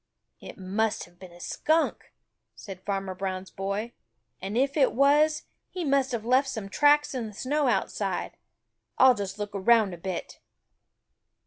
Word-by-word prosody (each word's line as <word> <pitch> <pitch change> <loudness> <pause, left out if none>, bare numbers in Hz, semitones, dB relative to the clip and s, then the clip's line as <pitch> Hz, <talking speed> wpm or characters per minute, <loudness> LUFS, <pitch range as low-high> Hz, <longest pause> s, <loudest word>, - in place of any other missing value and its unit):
"It - - -11
must 215 +3 -1
have 175 0 -17
been 185 -2 -12
a 175 - -15
Skunk," 315 - 0 0.4
said 190 -2 -10
Farmer 195 -1 -3
Brown's 185 0 -5
boy, 200 +4 -4 0.5
"and 195 +4 -3
if 275 +2 +1
it 280 -4 +3
was, 295 +4 +3 0.3
he 360 -3 -4
must 275 -2 +2
have 230 -3 -3
left 260 +3 +3
some 220 -6 -5
tracks 295 +5 +3
in 245 -4 -3
the 210 - -10
snow 285 +5 0
outside. 245 - -1 0.6
I'll 260 -1 +7
just 200 -3 -5
look 205 -1 -5
around 205 0 +3
a - - -7
bit." 185 0 -5
220 Hz, 155 wpm, -27 LUFS, 195-275 Hz, 0.6 s, I'll